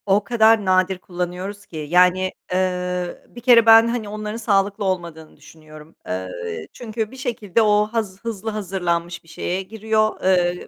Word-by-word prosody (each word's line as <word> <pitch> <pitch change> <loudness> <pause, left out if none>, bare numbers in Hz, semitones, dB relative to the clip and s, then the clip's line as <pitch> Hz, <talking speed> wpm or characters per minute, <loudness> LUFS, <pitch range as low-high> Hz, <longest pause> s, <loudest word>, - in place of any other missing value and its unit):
O 200 +1 +2
kadar 220 -1 +3
nadir 185 0 +2
kullanıyoruz 180 +3 -6
ki 160 - -10
yani, 180 +4 +3 0.2
eee, 180 -1 -2
bir 240 - -12
kere 235 -2 +6
ben, 225 0 +8
hani 230 -3 -3
onların 215 +1 -5
sağlıklı 200 -2 0
olmadığını 170 -4 -4
düşünüyorum. 155 0 -15
Eee, 85 -3 -5
çünkü 220 -2 -5
bir 265 - -12
şekilde 230 -5 -1
o 210 -1 +4
haz 210 -5 -3
hızlı 225 -2 -4
hazırlanmış 175 -5 -3
bir 165 - -21
şeye 180 +3 -3
giriyor, 215 +2 -1
eee, 180 -1 +1
190 Hz, 150 wpm, -21 LUFS, 175-215 Hz, 0.2 s, ben